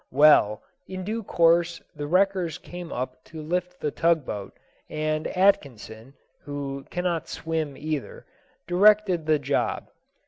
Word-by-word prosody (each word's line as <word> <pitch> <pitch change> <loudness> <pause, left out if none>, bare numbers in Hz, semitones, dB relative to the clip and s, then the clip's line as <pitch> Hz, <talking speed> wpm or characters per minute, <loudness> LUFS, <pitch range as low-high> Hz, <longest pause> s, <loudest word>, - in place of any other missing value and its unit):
Well, 135 -7 +5 0.2
in 185 0 -6
due 220 +4 -3
course 170 -3 +2 0.2
the 145 0 -5
wreckers 185 -1 +1
came 175 -1 -9
up 130 +1 -5
to 160 - -10
lift 180 +3 -3
the 150 - -2
tug 165 -3 +2
boat, 100 -2 -6 0.3
and 155 0 -2
Atkinson 135 - 0 0.3
(who 140 -1 -5
cannot 175 -3 -2
swim 160 -3 -3
either) 155 -1 -5 0.4
directed 190 -2 +4
the 155 -1 +4
job. 140 0 -2
160 Hz, 130 wpm, -25 LUFS, 145-180 Hz, 0.4 s, Well